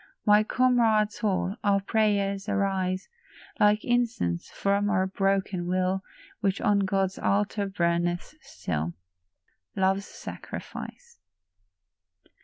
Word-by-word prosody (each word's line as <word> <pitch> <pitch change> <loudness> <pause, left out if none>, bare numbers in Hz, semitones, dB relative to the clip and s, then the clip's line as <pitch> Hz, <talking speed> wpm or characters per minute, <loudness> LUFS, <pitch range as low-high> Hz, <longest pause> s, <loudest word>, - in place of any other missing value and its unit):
My 210 -1 +6
comrade 225 -3 +3
soul, 200 -1 -1
our 200 -1 +3
prayers 200 -1 0
arise 190 -2 0 0.5
Like 210 +1 +4
incense 235 - 0
from 200 +1 0
our 190 -3 +2
broken 195 -2 0
will, 185 +1 0 0.4
Which 195 -3 0
on 205 -1 +3
God's 195 -1 0
altar 205 0 0
burneth 175 - -1
still, 80 0 -4 0.8
Love's 195 +1 +1
sacrifice. 475 -1 -9
195 Hz, 95 wpm, -27 LUFS, 185-210 Hz, 0.8 s, My